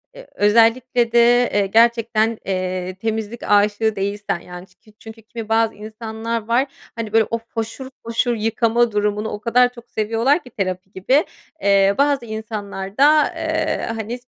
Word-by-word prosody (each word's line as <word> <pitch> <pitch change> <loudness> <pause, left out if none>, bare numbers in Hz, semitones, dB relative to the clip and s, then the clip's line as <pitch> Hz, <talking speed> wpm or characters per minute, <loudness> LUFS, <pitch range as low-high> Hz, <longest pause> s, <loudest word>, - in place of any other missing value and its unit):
e - - -11
özellikle 230 +3 +3
de, 240 +1 +4
eee, 205 -1 +2
gerçekten, 230 0 +2
eee, 185 -1 -3
temizlik 220 +2 -4
aşığı 210 +1 +2
değilsen, 200 -1 -2
yani, 180 +1 -11
ç 185 - -29
ki 215 - -23
çünkü 225 0 -12
kimi 225 0 -8
bazı 225 0 +2
insanlar 220 +1 -5
var, 245 +4 +2 0.3
hani, 220 -2 -5
böyle 225 -1 +4
o 230 - +1
foşur 225 +3 -6 0.2
foşur 230 +1 0
yıkama 230 +1 +1
durumunu 210 +1 -1
o 210 - -5
kadar 245 +3 +3
çok 240 -1 -14
seviyorlar 230 +9 +1
ki 250 - -13
terapi 190 -4 -4
gibi, 255 - +2 0.4
eee, 200 -2 +4
bazı 280 -3 +2
insanlar 210 -3 -6
da, 300 +2 +5
eee, - - -1
hani, 225 +2 -5
225 Hz, 155 wpm, -20 LUFS, 205-235 Hz, 0.4 s, da